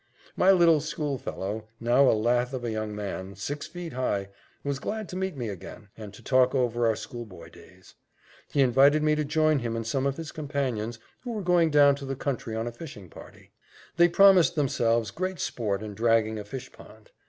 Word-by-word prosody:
My 185 - +3
little 170 -5 +5
schoolfellow, 130 -9 -4
now 125 +3 +4
a - - +4
lath 120 +3 +1
of 125 - -5
a 120 - -2
young 110 -1 -4
man, 100 -2 -5
six 145 +9 -5
feet 175 -3 -8
high, 100 -6 -2 0.3
was 140 -1 -2
glad 215 +6 -4
to - - -7
meet 190 -4 -3
me 120 -3 -3
again, 100 +2 -9
and 105 -2 -9
to - - -15
talk 130 0 +3
over 120 -2 +1
our 110 - +2
schoolboy 115 -6 -9
days. - - -17 0.6
He 140 - +2
invited 140 +4 +4
me 155 0 +3
to 150 0 0
join 155 0 +2
him 115 -2 -3
and 115 -1 -3
some 135 +4 0
of 140 - -2
his 165 -1 -6
companions, 130 -7 -3 0.2
who 245 -2 -6
were 210 -3 -4
going 175 -2 +3
down 145 -1 +6
to 140 - -8
the 135 - -3
country 125 -4 -3
on 110 +1 -2
a 120 - -4
fishing 120 - -11
party. - - -14 0.5
They 175 0 +6
promised 190 -1 +6
themselves 115 -7 +1
great 185 - -4
sport 105 -3 -2
in 105 -1 -6
dragging 110 0 +1
a 105 - -7
fish 130 +5 -8
pond. - - -17
130 Hz, 200 wpm, -27 LUFS, 110-155 Hz, 0.6 s, down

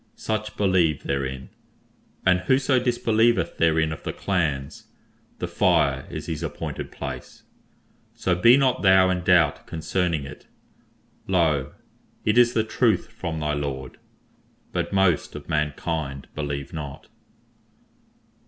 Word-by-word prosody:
Such 110 0 -3
believe 90 -7 +2
therein, 65 -1 -3 0.8
and 90 -1 +4
whoso 130 +6 +2
disbelieveth 115 -5 +1
therein 80 -1 +2
of 80 - -9
the - - -4
clans, 75 -7 -2 0.5
the - - -3
Fire 65 -1 +2
is 80 -1 -6
his 80 -1 -4
appointed 80 -3 -5
place. - - -8 0.7
So 90 - 0
be 115 +9 +6
not 135 -2 +2
thou 95 -1 +5
in 90 -1 -2
doubt 85 -4 +3
concerning 80 -2 -1
it. 70 - -11 0.8
Lo! 80 -8 +1 0.5
it 110 +3 +4
is 120 0 +5
the 110 - +2
Truth 110 -2 +1
from 85 -8 -5
thy 75 -1 -1
Lord; 70 -3 -4 0.7
but - - -2
most 95 -5 +2
of - - -9
mankind 75 -2 -2
believe 70 -2 -4
not. 70 -3 -7
85 Hz, 125 wpm, -24 LUFS, 75-100 Hz, 0.8 s, be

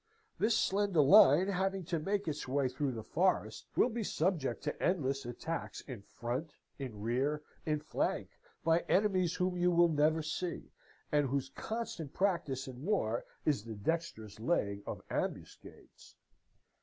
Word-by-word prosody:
This 220 +1 +3
slender 195 -4 +2
line, 145 +5 +7
having 195 0 0
to 165 -1 -1
make 195 +4 -1
its 150 -3 -3
way 135 +1 +1
through 130 +1 -2
the 110 -2 -6
forest, 110 - 0
will - - +4
be 230 0 -2
subject 160 - 0
to - - -3
endless 135 -7 0
attacks 160 +7 -4
in 125 -7 -8
front, 125 +9 -4 0.3
in 120 -7 -6
rear, 135 +7 0 0.2
in 150 -1 +1
flank, 155 - -1 0.3
by 165 +1 +4
enemies 185 -4 +2
whom 180 0 0
you 180 0 +3
will 170 -1 +5
never 155 +1 +2
see, 170 +3 -4 0.4
and 145 -2 +3
whose 135 0 -1
constant 215 -10 -5
practice 170 -9 0
in 130 -1 -8
war 140 - 0 0.2
is 145 -9 +2
the 115 -1 -7
dexterous 110 -4 -3
laying 100 -6 0
of - - -5
ambuscades.' - - -6
150 Hz, 150 wpm, -33 LUFS, 130-180 Hz, 0.4 s, line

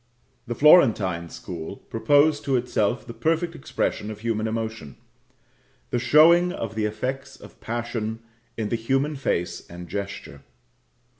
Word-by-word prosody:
The 120 - -3
Florentine 105 - +5
school 85 +1 -7
proposed 145 +5 +2
to 135 -2 +1
itself 120 -1 0
the 115 - -8
perfect 165 +5 0
expression 120 -7 -3
of 105 -1 -8
human 110 -1 -1
emotion 110 -9 -5 0.9
the 120 - +1
showing 170 +7 +5
of 115 - -5
the 110 -1 -1
effects 135 +6 -4
of - - -15
passion 115 -1 -3 0.4
in 110 -2 -2
the - - 0
human 135 +6 0
face 90 -10 -2
and 85 0 -9
gesture. 100 -8 -6
115 Hz, 135 wpm, -24 LUFS, 105-140 Hz, 0.9 s, Florentine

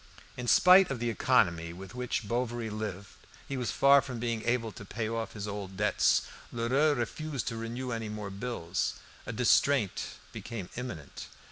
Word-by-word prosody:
In 125 0 -5
spite 185 - +7
of 135 - -2
the 120 0 0
economy 85 -5 +2
with 95 +4 -10
which 125 -3 -2
Bovary 120 -1 -2
lived, 100 -2 -5 0.4
he 140 - -3
was 125 -2 -2
far 140 0 +6
from 130 -3 -6
being 115 -1 -2
able 120 -2 +1
to 105 - -10
pay 110 +2 -3
off 115 0 -3
his 105 -1 -5
old 100 -2 -6
debts. 105 +1 +3 0.3
Lheureux 130 +6 +2
refused 140 +2 -3
to 115 - -5
renew 120 +3 -4
any 115 -2 -3
more 105 -2 -5
bills. 95 -5 -2 0.3
A - - -2
distraint 135 -9 +2 0.2
became 110 -6 -6
imminent. 105 - -6
115 Hz, 165 wpm, -30 LUFS, 105-125 Hz, 0.4 s, spite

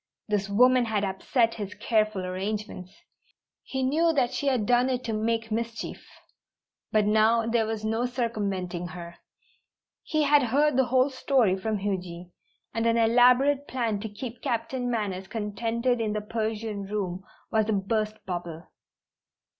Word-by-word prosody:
This 205 -2 -1
woman 250 +4 +5
had 215 -2 -1
upset 225 +5 +1
his 205 -2 -6
careful 215 -4 0
arrangements! 190 0 -4 0.7
He 265 -1 -3
knew 320 +6 +3
that 260 -4 +1
she 280 +3 -2
had 255 -6 +2
done 245 +3 +3
it 255 -1 -1
to 225 - -3
make 225 +1 -1
mischief. 230 +1 -4 0.9
But 215 -1 +3
now 220 +2 +3
there 230 -1 +1
was 220 -1 -3
no 225 +3 0
circumventing 200 -8 -2
her. 170 0 -9 0.8
He 310 -1 0
had 290 0 +5
heard 280 +4 +2
the 265 0 +4
whole 255 +2 +2
story 255 -7 +2
from 215 +3 -2
Huji, 180 -3 -4 0.4
and 225 0 0
an 230 0 +3
elaborate 250 +5 +4
plan 230 -5 -1
to 220 +2 -5
keep 230 +3 -8
Captain 245 +2 -2
Manners 200 -5 -2
contented 230 +3 -1
in 215 -2 -1
the 210 - -2
Persian 215 -1 -3
room 190 -3 -3 0.3
was 220 -1 +2
a - - +2
burst 215 +2 -1
bubble. 175 -3 -6
220 Hz, 150 wpm, -27 LUFS, 205-245 Hz, 0.9 s, woman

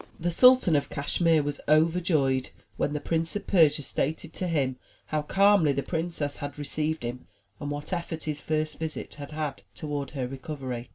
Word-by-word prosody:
The 175 +1 0
Sultan 250 -3 +6
of 145 - +1
Cashmere 155 +2 +2
was 145 0 -3
overjoyed 155 -4 +3 0.3
when 145 - -1
the 150 - -1
Prince 165 +3 -1
of 205 - -3
Persia 155 -5 +4
stated 160 +4 -2
to 185 - -3
him 135 -6 0 0.3
how 155 -1 -1
calmly 195 -1 +4
the 140 - -1
princess 165 -4 -2
had 145 0 -6
received 150 0 -1
him 120 +1 -5 0.3
and 145 - -4
what 145 +5 -4
effect 170 -2 -3
his 150 -1 -3
first 155 0 -2
visit 160 -1 -5
had 140 - -7
had 150 -3 -4
toward 145 -3 -4
her 125 -2 -1
recovery. 130 -2 -6
150 Hz, 175 wpm, -27 LUFS, 140-165 Hz, 0.3 s, Sultan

